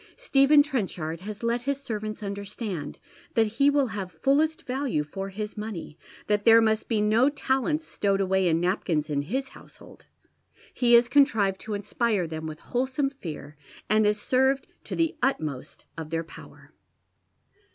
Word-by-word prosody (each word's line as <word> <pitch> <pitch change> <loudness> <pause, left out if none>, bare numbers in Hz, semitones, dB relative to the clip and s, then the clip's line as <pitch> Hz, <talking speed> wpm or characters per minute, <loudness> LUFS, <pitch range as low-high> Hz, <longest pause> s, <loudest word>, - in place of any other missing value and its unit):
Stephen 290 - +5
Trenchard 185 - -3
has 205 +4 -8
let 235 +1 0
his 280 +2 -2
servants 215 -5 -5
understand 200 -3 -5 0.4
that 225 - +4
he 230 +7 +2
will 285 -1 +3
have 195 -4 -5
fullest 280 - +1
value 255 - -1
for 195 +6 -6
his 210 +2 -6
money, 210 -8 -6 0.3
that 210 -1 +1
there 230 0 +8
must 220 -1 +1
be 220 -3 +1
no 220 +6 +4
talents 290 +3 -1
stowed 200 -1 0
away 190 -1 +2
in 165 -1 +2
napkins 170 -4 -1
in 140 -1 +1
his 260 - -3
household. - - -16 0.7
He 240 -1 +2
has 235 0 +7
contrived 225 -8 +3
to 215 -1 -4
inspire 205 -1 0
them 160 0 -5
with 155 0 -7
wholesome 265 +3 -1
fear, 155 - -8 0.4
and 215 0 +4
is 210 0 +1
served 265 +4 +2 0.2
to - - -5
the 330 +1 0
utmost 155 - -2
of 160 -2 -7
their 165 0 -2
power. 160 - -14
215 Hz, 160 wpm, -26 LUFS, 185-265 Hz, 0.7 s, there